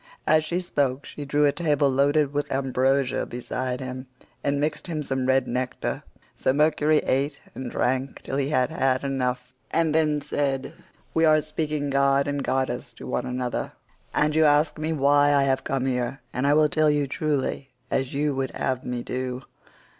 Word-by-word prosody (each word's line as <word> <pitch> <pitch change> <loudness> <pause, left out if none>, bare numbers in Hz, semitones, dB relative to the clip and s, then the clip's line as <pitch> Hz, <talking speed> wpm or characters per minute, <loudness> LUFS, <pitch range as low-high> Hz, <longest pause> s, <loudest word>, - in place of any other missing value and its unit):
As 155 0 +4
she 170 +3 -1
spoke 145 -6 -1
she 145 - -7
drew 145 +1 +2
a 145 - +4
table 150 -3 +1
loaded 140 +2 +2
with 145 0 -2
ambrosia 135 0 +1
beside 125 +1 -3
him 130 0 -6 0.4
and 140 0 +1
mixed 150 +5 -2
him 155 -3 -3
some 130 -2 -2
red 130 -1 +3
nectar, 125 +1 -2 0.3
so - - +1
Mercury 150 +1 +3
ate 140 +2 0
and 130 -2 -5
drank 130 +3 -1
till 135 - -3
he 140 0 0
had 130 -1 +1
had 135 -4 +1
enough, 125 -2 -2 0.2
and 165 -2 +1
then 155 -2 +2
said: 140 -2 -2 0.4
"We 160 - +2
are 155 -1 +5
speaking 150 -1 -2
god 140 0 +3
and 145 -1 -2
goddess 130 -1 -1
to - - -11
one 125 - -2
another, 125 -1 -3 0.4
and 150 0 +1
you 160 +1 +4
ask 150 +1 +3
me 155 +1 -1
why 145 -1 +4
I 140 - +4
have 135 -1 +1
come 135 -1 -1
here, 125 0 -1
and 130 +3 0
I 145 - +4
will 155 0 +5
tell 155 +1 +2
you 145 -1 +2
truly 140 -1 -2 0.2
as 130 -1 0
you 145 +1 0
would 135 -1 -1
have 130 -1 -1
me 125 -1 -3
do. 130 0 -4
140 Hz, 185 wpm, -25 LUFS, 130-150 Hz, 0.4 s, are